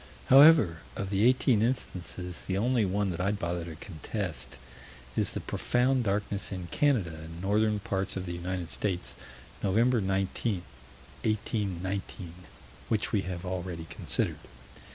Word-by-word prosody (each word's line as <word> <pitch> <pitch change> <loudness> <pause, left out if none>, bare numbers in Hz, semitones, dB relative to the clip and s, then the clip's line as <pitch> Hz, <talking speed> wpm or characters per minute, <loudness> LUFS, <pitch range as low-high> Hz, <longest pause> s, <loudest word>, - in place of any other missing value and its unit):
However, 135 - +8 0.2
of 95 0 -3
the 100 +1 +2
eighteen 125 -3 +3
instances, 90 -7 -3
the 95 - -1
only 120 +1 +2
one 100 +1 0
that 85 +1 -3
I'd 100 +2 +1
bother 85 -2 -2
to 80 -2 -7
contest 80 - -5 0.6
is - - +1
the - - -2
profound 125 0 +1
darkness 100 0 -1
in 90 -3 -5
Canada 125 - +2
and 80 +1 -9
northern 105 +3 +2
parts 95 -1 -2
of 95 - -3
the 85 - -4
United 90 0 -3
States, 95 -4 -2 0.5
Nov. 95 -1 0
19, 115 -3 +3 1.2
1819 100 -4 -2 0.6
which 110 -2 0
we 105 - +2
have 90 -1 -5
already 90 -2 -4
considered. - - -1
95 Hz, 135 wpm, -29 LUFS, 90-110 Hz, 1.2 s, However